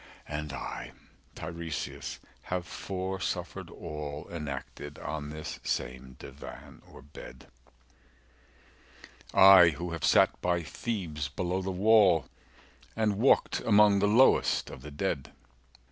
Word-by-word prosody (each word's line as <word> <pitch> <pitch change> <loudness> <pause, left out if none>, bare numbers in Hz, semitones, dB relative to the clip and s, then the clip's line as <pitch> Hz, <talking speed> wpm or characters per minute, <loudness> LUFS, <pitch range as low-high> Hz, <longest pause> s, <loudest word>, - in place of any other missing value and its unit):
(And 75 0 -4
I 65 -2 -6 0.4
Tiresias 80 -1 -5 0.3
have 90 -1 -2
foresuffered 95 0 -4
all 75 -2 -7
Enacted 75 -2 -6
on 75 -1 -5
this 75 0 -7
same 65 +1 -4
divan - - -11
or - - -13
bed; 70 -3 -12 1.9
I 95 -3 +8
who 85 +2 -5
have 85 -2 -5
sat - - +4
by 85 -1 0
Thebes 80 -8 -4
below 90 +5 -2
the 95 - -4
wall 95 -3 +5 0.7
245 110 - -1
And 105 -2 +1
walked 135 - +4
among 105 -2 +5
the 100 - +2
lowest 120 +6 +4
of - - -10
the 75 - -9
dead.) 70 -1 -3
85 Hz, 115 wpm, -29 LUFS, 75-95 Hz, 1.9 s, I